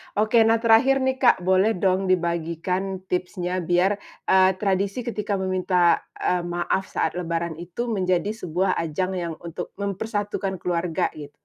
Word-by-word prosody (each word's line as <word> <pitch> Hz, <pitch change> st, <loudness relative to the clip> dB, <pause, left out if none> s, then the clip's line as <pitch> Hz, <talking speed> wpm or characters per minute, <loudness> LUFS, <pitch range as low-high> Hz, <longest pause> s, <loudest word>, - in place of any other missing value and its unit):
Oke, 215 Hz, +3 st, +3 dB
nah 225 Hz, -, +5 dB
terakhir 260 Hz, +4 st, +5 dB
nih 260 Hz, 0 st, 0 dB
Kak, 240 Hz, -8 st, +4 dB
boleh 190 Hz, +4 st, +3 dB
dong 190 Hz, +1 st, +1 dB
dibagikan 180 Hz, +2 st, -1 dB
tipsnya 180 Hz, 0 st, -2 dB
biar, 180 Hz, +4 st, +1 dB, 0.2 s
eee, 190 Hz, 0 st, +4 dB
tradisi 200 Hz, +4 st, -1 dB
ketika 210 Hz, -3 st, -2 dB
meminta, 185 Hz, -2 st, +2 dB, 0.2 s
eee, 180 Hz, -, 0 dB
maaf 175 Hz, +2 st, -1 dB
saat -, -, -1 dB
lebaran 170 Hz, -1 st, -3 dB
itu 185 Hz, +8 st, -4 dB
menjadi 185 Hz, -1 st, 0 dB
sebuah 185 Hz, -3 st, -1 dB
ajang 170 Hz, +3 st, -2 dB
yang 170 Hz, -2 st, -3 dB
untuk 170 Hz, +1 st, -7 dB
mempersatukan 200 Hz, 0 st, -3 dB
keluarga, 170 Hz, -2 st, 0 dB
git 145 Hz, -2 st, -10 dB
185 Hz, 140 wpm, -24 LUFS, 175-205 Hz, 0.2 s, nah